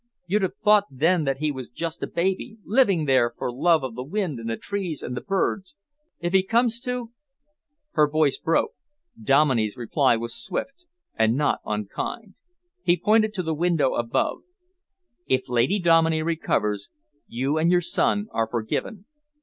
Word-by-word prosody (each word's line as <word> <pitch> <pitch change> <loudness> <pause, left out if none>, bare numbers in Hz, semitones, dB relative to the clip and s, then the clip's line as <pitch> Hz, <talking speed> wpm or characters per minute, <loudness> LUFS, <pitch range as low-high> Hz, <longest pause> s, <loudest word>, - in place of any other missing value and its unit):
You'd 200 +4 +1
have 190 0 -1
thought 210 -1 +4
then 160 +5 +1
that 135 -1 0
he 155 +1 -1
was 130 -3 -7
just 165 +6 -5
a - - -2
baby, 190 +6 -2
living 200 - +3
there 125 -4 +2
for 125 - -3
love 160 +3 +3
of 130 -3 -4
the 125 - -6
wind 165 - -3
and 115 0 -5
the 115 - -2
trees 190 -7 -4
and 125 - -4
the - - -4
birds. 195 -1 -2 0.4
If 175 +1 -3
he 190 - +6
comes 230 +4 +1
to 250 -2 -4 0.4
" 300 0 -55
Her 150 -2 +3
voice 155 -2 +2
broke. 165 - +1 0.5
Dominey's 135 - +2
reply 125 +1 +2
was 115 0 -5
swift 275 - -5 0.3
and 110 +1 +2
not 145 +1 +1
unkind. 105 - -4 0.5
He 175 - +3
pointed 215 +2 +3
to 185 - -2
the 160 -1 -1
window 165 -4 +1
above. 120 0 -1 0.9
"If 130 0 +1
Lady 125 - +2
Dominey 165 -3 +3
recovers, 105 -11 -1 0.4
you 135 +6 -1
and 165 +2 +3
your 180 0 +4
son 205 +4 +1
are 115 0 0
forgiven. 120 - -3
160 Hz, 165 wpm, -24 LUFS, 130-195 Hz, 0.9 s, he